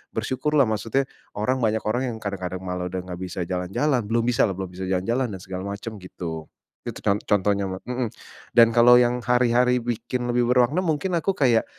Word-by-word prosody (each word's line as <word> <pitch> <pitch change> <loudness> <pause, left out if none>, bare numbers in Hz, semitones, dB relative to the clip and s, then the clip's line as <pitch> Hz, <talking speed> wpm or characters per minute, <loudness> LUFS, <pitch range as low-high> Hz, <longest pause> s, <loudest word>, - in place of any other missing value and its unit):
bersyukurlah 140 0 +1
maksudnya 115 +5 0 0.3
orang 130 +6 0
banyak 110 0 +1
orang 125 +4 0
yang 110 - -6
kadang-kadang 95 -3 -4
malah 90 -1 -3
udah 95 - -2
nggak 90 -1 -6
bisa 90 0 -5
jalan-jalan, 95 - 0
belum 115 +2 0
bisalah, 115 -4 +3
belum 95 -1 -5
bisa 95 - -5
jalan-jalan 115 +6 0
dan 95 - -6
segala 95 0 -6
macam 110 +2 -7
gitu. 80 -3 -6 0.4
Itu - - -6
con 100 - +3
contohnya, 100 -1 +1
ma 95 - -4
mhm, 125 -2 -2 0.5
dan 115 -1 +7
kalau 120 +1 +8
yang 125 0 +2
hari-hari 125 0 +3
bikin 120 +1 -3
lebih 120 0 +1
bermakna 125 +7 +3
mungkin 170 +2 0
aku 195 - 0
kayak 120 -5 +3
115 Hz, 185 wpm, -24 LUFS, 95-125 Hz, 0.5 s, kalau